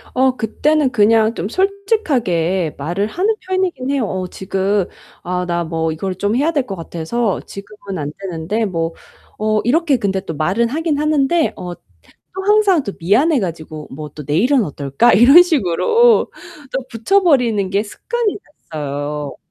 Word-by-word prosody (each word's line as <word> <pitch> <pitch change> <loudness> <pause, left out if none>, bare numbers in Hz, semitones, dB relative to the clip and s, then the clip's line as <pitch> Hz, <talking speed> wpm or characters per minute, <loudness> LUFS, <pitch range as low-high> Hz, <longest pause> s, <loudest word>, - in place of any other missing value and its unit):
어 260 0 +3
그때는 290 +5 +1
그냥 220 0 +3
좀 195 -1 -4
솔직하게 255 - 0
말을 175 +9 -2
하는 375 - 0
편이긴 370 -8 -2
해요. 275 -4 0
"어 185 -2 -3
지금 190 +1 -1 0.4
아 180 +1 -2
나 170 0 -1
뭐 160 0 -2
이걸 185 +4 -3
좀 205 +4 -1
해야 295 +6 +2
될 280 -6 -1
것 195 - -4
같아서 175 +6 -2
지금은 200 -1 -8
안 145 -2 -4
되는데." 195 +4 -2
뭐 165 -4 -2 0.5
어 215 0 +1
이렇게 295 +3 +2
근데 195 -3 -1
또 165 - -6
말은 190 +10 +1
하긴 310 +1 -1
하는데 305 +1 +2
어 180 -1 -6 0.4
또 385 - -10
항상 410 -5 +4
또 200 - -5
미안해 265 - +3
가지고 160 -6 -5
뭐 150 +2 -7
또 150 - -8
"내일은 230 - +2
어떨까?" 145 - +1
이런 270 - +8
식으로 360 - +3 0.4
또 265 - -2
붙여 305 - +2
버리는 235 - +2
게 200 +2 +1
습관이 455 - -3 0.4
됐어요. 145 0 -4
215 Hz, 290 characters per minute, -18 LUFS, -, 0.5 s, 이런